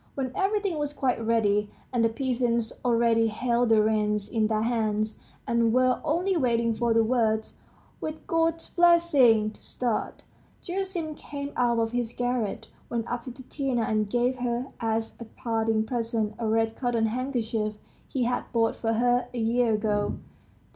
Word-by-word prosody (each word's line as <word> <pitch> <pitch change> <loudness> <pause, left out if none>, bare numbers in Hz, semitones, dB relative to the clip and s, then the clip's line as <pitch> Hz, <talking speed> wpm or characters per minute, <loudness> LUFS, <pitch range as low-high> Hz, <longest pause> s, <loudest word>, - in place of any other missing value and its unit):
When 260 -2 -2
everything 390 -4 0
was 295 0 -2
quite 255 -5 0
ready, 210 -2 +2 0.2
and 240 -2 +2
the 230 - +4
peasants 235 -2 0
already 230 -2 +3
held 235 +2 0
the 220 -1 +5
reins 210 -1 +1
in 220 -2 +2
their 215 0 0
hands, 220 -2 -1 0.3
and 235 -1 +2
were 255 +1 +3
only 360 +5 +1
waiting 235 -6 +2
for 235 +1 0
the 225 0 +4
words 220 -2 0 0.4
"With 310 0 -6
God's 330 0 0
blessing!" 300 -11 +4
to - - -17
start, 240 -3 -3 0.4
Gerasim 360 -4 -3
came 285 -1 -7
out 240 -1 +2
of 225 0 0
his 240 -1 -2
garret, 245 -4 -2 0.2
went 235 -1 -2
up 245 0 -2
to 255 - -6
Tatiana, 260 -1 -2
and 215 -1 0
gave 245 +3 +1
her 245 +1 -2
as 225 -1 -2
a 235 - -7
parting 225 -2 -1
present 230 -2 -1
a 230 - -1
red 225 0 +1
cotton 240 -3 0
handkerchief 225 -3 -2 0.3
he 260 - -1
had 245 +1 -2
bought 230 -2 +2
for 225 -1 -1
her 245 +2 +2
a - - -3
year 230 0 +2
ago. 210 -1 0
235 Hz, 160 wpm, -27 LUFS, 225-255 Hz, 0.4 s, the